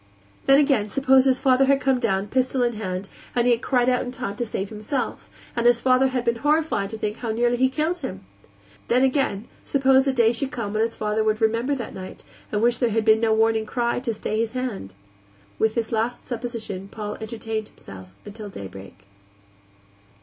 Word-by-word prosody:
Then, 275 - +7
again, 275 -8 +2
suppose 265 +2 +4
his 260 -1 +3
father 265 0 +4
had 275 0 +3
come 265 -2 +1
down, 195 -5 0
pistol 255 +1 +1
in 240 0 +1
hand, 190 -3 -4 0.3
and 240 -1 +2
he 245 - +4
had 235 0 +2
cried 250 -2 +1
out 250 -1 +3
in 245 - -4
time 235 -5 -5
to 240 - -2
save 195 -2 -3
himself, 215 +5 -4 0.3
and 235 0 +2
his 240 -1 +5
father 260 +1 +4
had 255 -2 -2
been 235 0 +1
horrified 295 -7 +1
to 220 - -6
think 210 0 -3
how 235 - -5
nearly 240 +2 +1
he 255 +2 +3
had 260 - -8
killed 315 +4 0
him? 95 - -6 0.6
Then, 250 +2 +3
again, 260 -6 0 0.2
suppose 270 -1 +3
a - - +4
day 235 -3 +3
should 250 +3 -2
come 230 -6 -4
when 215 - +1
his 225 0 0
father 215 0 0
would 215 0 +1
remember 230 +5 +1
that 240 -4 -6
night, 185 0 -9 0.3
and 210 +1 0
wish 240 0 +2
there 240 - +2
had 225 0 0
been 220 0 +5
no 225 -1 +2
warning 220 0 +2
cry 235 0 0
to 245 -2 -2
stay 215 0 -3
his 230 0 -1
hand? 235 - -4 0.6
With 220 0 +2
this 230 -2 -2
last 230 +2 -1
supposition 225 -5 -5
Paul 210 0 -6
entertained 220 -1 -4
himself 95 -1 -13
until 205 0 -8
daybreak. 95 - -10
235 Hz, 210 wpm, -24 LUFS, 215-255 Hz, 0.6 s, Then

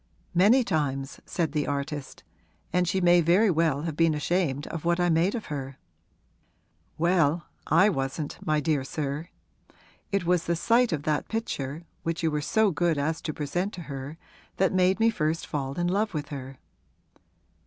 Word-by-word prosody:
'Many 215 +9 +5
times,' 140 - -2
said 165 -5 -1
the 150 -1 -1
artist; 145 0 -4 0.5
'and 180 0 +2
she 190 +3 +1
may 175 -1 +5
very 185 +6 +4
well 160 -3 +1
have 165 -3 -3
been 165 -1 +3
ashamed 150 -2 0
of 165 - -6
what 170 +1 +1
I 175 0 +3
made 170 +6 +2
of 225 - -4
her.' 135 -1 -5 1.2
'Well, 170 -2 +2 0.2
I 165 +6 +5
wasn't, 145 -4 -2
my 155 0 +1
dear 150 -2 +1
sir; 145 +4 -4 0.8
it 195 -3 0
was 175 -1 +2
the 170 - +1
sight 235 +7 +3
of 150 -3 -2
that 150 -1 -1
picture, 160 - -3 0.2
which 165 0 -3
you 160 - +2
were 150 0 -1
so 215 +6 +2
good 165 0 +1
as 155 +3 -1
to 155 - -3
present 175 +7 -2
to 180 - -7
her, 140 +1 -7 0.4
that 190 -1 +2
made 185 +1 +3
me 225 +1 +4
first 160 -4 -1
fall 140 -2 -3
in 175 - -1
love 200 +1 0
with 150 -1 -3
her.' 135 -2 -7
165 Hz, 175 wpm, -27 LUFS, 145-180 Hz, 1.2 s, Many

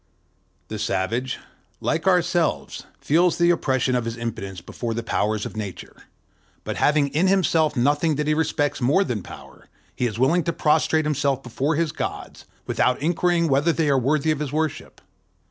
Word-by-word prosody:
The - - -5
savage, 115 +7 -1 0.4
like 165 +3 -1
ourselves, 175 -2 +1
feels 170 +4 +2
the 170 0 +4
oppression 130 -6 0
of 125 -2 0
his 115 0 -4
impotence 100 -5 -5
before 115 +7 -5
the 115 - -3
powers 110 -1 -1
of - - -7
Nature; 105 -4 -7 0.7
but - - -4
having 145 -1 +3
in 160 +7 +1
himself 165 -5 +2
nothing 145 +5 +2
that 150 +1 -1
he 155 - +2
respects 150 -2 0
more 145 +11 +3
than 120 - -3
Power, - - -13 0.3
he 125 - 0
is 110 -2 -5
willing 140 +8 +3
to 170 - 0
prostrate 155 0 +2
himself 140 -3 0
before 135 +5 -1
his 160 0 0
gods, - - -6 0.2
without 125 0 +1
inquiring 170 +2 +1
whether 145 +4 +3
they 160 -2 0
are 135 - +3
worthy 150 +4 +1
of 155 - -1
his 150 -3 -3
worship. 155 0 -3
145 Hz, 170 wpm, -23 LUFS, 125-160 Hz, 0.7 s, the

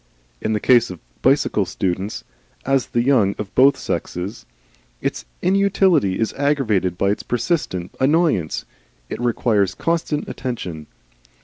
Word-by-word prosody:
In 110 - 0
the 105 - +1
case 120 +1 +4
of 90 -2 -8 0.2
bicycle 135 -6 +3
students, 95 +3 -3 0.4
as 135 -1 +2
in - - -27
the 120 - +2
young 115 -8 +3
of 105 -2 -6
both 135 +2 +5
sexes, 90 -9 -4 0.5
its - - -3 0.2
inutility 190 - +3
is 110 - 0
aggravated 115 - +1
by 100 +2 +2
its 105 - -2
persistent 120 - -2
annoyance 140 - +1 0.5
it - - -4
requires 110 -5 +1
constant 165 -3 -1
attention. 90 - -5
120 Hz, 130 wpm, -21 LUFS, 95-140 Hz, 0.5 s, both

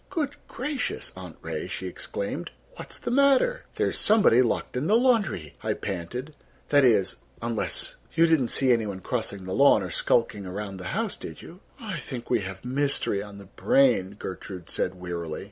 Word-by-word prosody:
"Good 295 -4 -2
gracious, 275 +2 -3
Aunt - - -9
Ray," - - -4
she - - -5
exclaimed, - - -4 0.3
"what - - -9
is - - -4
the - - -4
matter?" 280 - +4
"There's - - 0
somebody 205 - +5
locked 120 0 -1
in 130 +5 -1
the 210 - +4
laundry," 220 - +2
I - - -1
panted. 115 - -5 0.3
"That 145 -1 +5
is—unless—you 115 - 0
didn't 160 -7 +3
see 130 +2 +4
any 115 -3 +2
one 95 -2 -5
crossing 100 -3 -2
the 95 0 -4
lawn 140 -6 +5
or 90 - -5
skulking 110 -2 +1
around 100 +1 -5
the 90 - -8
house, 225 -3 -1
did - - -9
you?" 175 - -12 0.2
"I 210 -8 -4
think 120 -1 -6
we 120 - +4
have 95 +1 -7
mystery 135 -6 +1
on 100 0 -9
the 100 - -11
brain," 160 - +3
Gertrude 95 -2 -7
said 95 - -1
wearily. 85 -3 -5
120 Hz, 175 wpm, -26 LUFS, -, 0.3 s, somebody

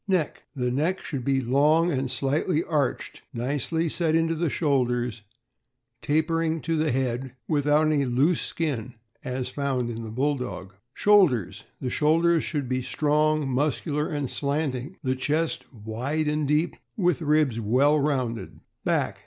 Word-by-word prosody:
Neck. 180 -6 -1
— 135 - -47
The 125 -2 -1
neck 160 +9 0
should 135 -5 -4
be 135 +1 +1
long 150 +7 +3
and 135 -3 -1
slightly 145 +6 0
arched, 145 -5 -2
nicely 145 +7 -1
set 160 0 +1
into 165 0 +2
the 165 0 0
shoulders, 125 -6 0 0.8
tapering 160 +2 +1
to 165 +1 -1
the 155 -1 +1
head, 130 0 -2
without 150 0 +3
any 150 -3 +2
loose 135 +7 +2
skin, 130 -7 -3 0.3
as 125 0 -3
found 130 -3 -1
in 115 0 -5
the 110 - -6
Bulldog. 125 -6 -2 0.2
Shoulders. 185 - +3
— - - -40
The 125 - -2
shoulders 165 +3 +3
should 145 -5 -2
be 130 +1 -1
strong, 150 +2 +1
muscular, 145 +3 0
and 145 -3 -2
slanting; 140 +3 -2
the 130 -1 0
chest 155 +5 -1
wide 125 +7 -3
and 150 -1 0
deep, 150 +4 +1 0.2
with 180 -5 +1
ribs 150 -6 +2
well 130 +8 +3
rounded. 130 -6 -2 0.2
Back. - - 0
145 Hz, 150 wpm, -26 LUFS, 130-155 Hz, 0.8 s, long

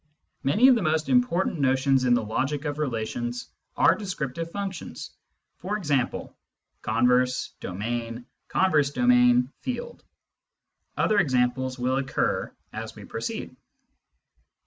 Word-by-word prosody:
Many 205 - +4
of 265 - +8
the 235 - +1
most 155 -2 0
important 190 -9 +2
notions 135 -1 +3
in 120 -1 +5
the 120 - 0
logic 135 +7 -2
of 145 0 -3
relations 120 -2 -3 0.3
are - - +6
descriptive 165 -6 -4
functions, 195 0 -6 0.5
for 205 +4 -3
example: 145 -10 -1 0.5
converse, 125 +1 +2
domain, 115 +5 -4 0.2
con 190 0 +2
verse 145 -2 +3
domain, 125 -1 +4
field. 375 - -5 0.9
Other 215 -1 +3
examples 130 -2 +1
will 130 +1 0
occur 135 -1 -1 0.2
as - - -6
we - - -10
proceed. - - -5
135 Hz, 120 wpm, -26 LUFS, 125-170 Hz, 0.9 s, of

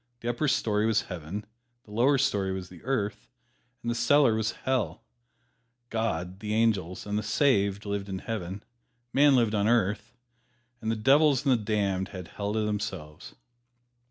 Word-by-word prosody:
The 120 - -2
upper 135 +6 -1
story 105 -5 +1
was 110 -2 +2
Heaven, 90 +5 -6 0.4
the 105 - -17
lower 125 +6 +3
story 100 -8 +1
was 95 -1 -5
the 90 -2 -13
Earth, 105 - -2 0.5
and 120 - -1
the - - 0
cellar 120 +1 +4
was 110 0 0
Hell. 130 -3 -2 0.9
God, 95 -5 -2
the 105 +1 -2
angels 100 -6 +1
and 105 0 -1
the - - -2
"saved" 100 -7 +1
lived 100 -1 -3
in 95 - -3
Heaven, 100 -2 -5 0.5
man 140 0 +6
lived 115 -4 +2
on 105 -1 +2
Earth, 110 0 +1 0.6
and 110 - -2
the 115 - +1
devils 140 +5 +4
and 135 - +4
the 115 -4 +2
damned 100 -3 0
had 95 -3 -8
Hell 100 0 -3
to 110 - +1
themselves. 105 -8 -4
105 Hz, 165 wpm, -28 LUFS, 100-120 Hz, 0.9 s, man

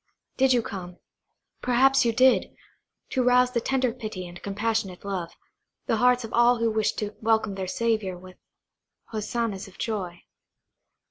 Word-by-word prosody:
Did 265 0 +3
you 245 -2 +3
come–perhaps 245 +8 -1
you 235 - +3
did!–to 255 +1 0
rouse 250 0 +4
to 235 -2 0
tender 255 -1 0
pity 215 -7 -6
and 175 0 -11
compassionate 200 -2 -2
love, 180 -4 -4 0.5
the 225 - +1
hearts 250 +1 +3
of 225 - -8
all 240 +1 +5
who 230 -1 +1
wished 220 -1 0
to 210 0 -4
welcome 220 -2 +2
their 190 -1 -4
Saviour 215 -3 -1
with 185 +1 -14 0.7
hosannas 215 -2 -3
of 195 - -16
joy? 185 -6 -4
220 Hz, 140 wpm, -26 LUFS, 195-245 Hz, 0.7 s, all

